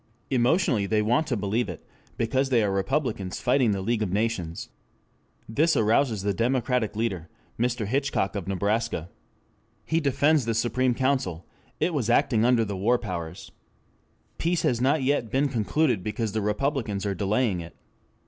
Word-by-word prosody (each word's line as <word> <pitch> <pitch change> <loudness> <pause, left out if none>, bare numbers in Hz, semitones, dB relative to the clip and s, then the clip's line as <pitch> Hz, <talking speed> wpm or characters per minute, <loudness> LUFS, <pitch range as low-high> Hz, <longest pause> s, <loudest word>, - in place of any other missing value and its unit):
Emotionally 125 - +2
they 105 0 +1
want 125 +8 +2
to 125 - -1
believe 105 +2 -1
it, 90 - -8 0.3
because 130 +4 0
they 120 -4 +3
are 100 - +1
Republicans 100 -2 -1
fighting 125 -1 +2
the 100 -2 -1
League 115 +2 0
of 100 -4 -1
Nations. 100 -6 -2 0.8
This 155 +9 +2
arouses 110 -1 +2
the 100 0 +1
Democratic 120 0 0
leader, 95 -8 -2 0.3
Mr. 120 -2 0
Hitchcock 135 -3 -1
of 95 -3 -4
Nebraska. 100 -2 -1 0.8
He 160 - +1
defends 145 -1 +2
the 115 -1 -1
Supreme 125 +2 +1
Council: 130 - -1 0.3
it 175 - +1
was 125 -7 -1
acting 115 -2 +3
under 120 -2 +3
the 100 -1 -4
war 110 +6 +2
powers. 90 -5 -6 0.9
Peace 170 0 0
has 120 -1 +1
not 140 +2 +2
yet 130 -4 +1
been 140 +5 +1
concluded 120 - +1
because 105 +2 -3
the 110 +1 -1
Republicans 105 -1 -1
are 100 - 0
delaying 100 +1 0
it. 85 - -11
115 Hz, 160 wpm, -26 LUFS, 100-130 Hz, 0.9 s, they